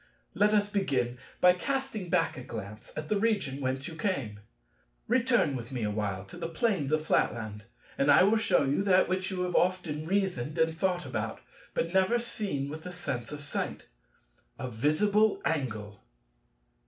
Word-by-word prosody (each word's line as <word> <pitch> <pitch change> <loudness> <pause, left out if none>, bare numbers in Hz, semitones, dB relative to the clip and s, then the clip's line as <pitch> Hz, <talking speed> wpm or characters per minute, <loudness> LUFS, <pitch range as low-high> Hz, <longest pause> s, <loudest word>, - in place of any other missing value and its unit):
Let 210 0 +3
us 205 -1 +3
begin 130 -12 0 0.2
by 180 0 +7
casting 265 -2 -3
back 170 -1 +2
a 130 - -7
glance 110 -3 -8
at 155 0 -4
the 210 - +1
region 200 -11 0
whence 130 +1 -2
you 165 - -7
came. 140 - -2 0.7
Return 240 - +3
with 120 0 -6
me 125 -3 -3
a 105 - 0
while 100 -2 -2
to - - -11
the 165 - -4
plains 165 -4 0
of 155 0 +1
Flatland 110 -7 0 0.3
and 140 - +3
I - - +8
will 210 +4 +4
shew 185 -10 +2
you 140 +7 +1
that 190 -2 +4
which 185 +1 -1
you 185 -2 -2
have 180 -1 -2
often 175 -4 +1
reasoned 180 -7 0
and 160 0 +2
thought 180 -1 0
about, 110 -4 -3 0.4
but 165 +1 -1
never 190 +5 +4
seen 205 -12 -2
with 155 +2 -6
the 180 - -7
sense 125 -9 -4
of 150 0 -6
sight—a - - -7
visible 200 - +2
angle." 105 -9 -2
155 Hz, 170 wpm, -29 LUFS, 125-190 Hz, 0.7 s, I